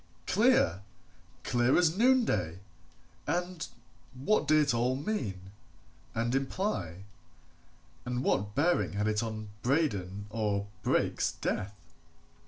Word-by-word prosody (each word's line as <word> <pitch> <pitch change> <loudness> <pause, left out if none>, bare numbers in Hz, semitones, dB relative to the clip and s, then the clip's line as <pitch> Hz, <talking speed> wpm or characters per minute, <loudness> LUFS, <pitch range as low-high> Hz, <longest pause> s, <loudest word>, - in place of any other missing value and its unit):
Clear! 210 - +3 0.6
clear 120 +2 +3
as 170 -2 +3
noonday! 235 - +2 0.7
And 175 -1 -2 0.5
what 155 +6 +1
did 155 +1 +5
it 145 -4 +3
all 120 +2 +1
mean, 110 - -3 0.6
and 115 +2 0
imply, 135 - -2 1.0
and 125 +1 -2
what 105 -2 0
bearing 165 -2 +2
had 105 +1 0
it 110 0 +1
on 110 -2 -5
Braden 105 - 0
or 105 -3 -1 0.2
Brake's - - +1
death? 100 +2 -3
125 Hz, 105 wpm, -30 LUFS, 100-160 Hz, 1.0 s, did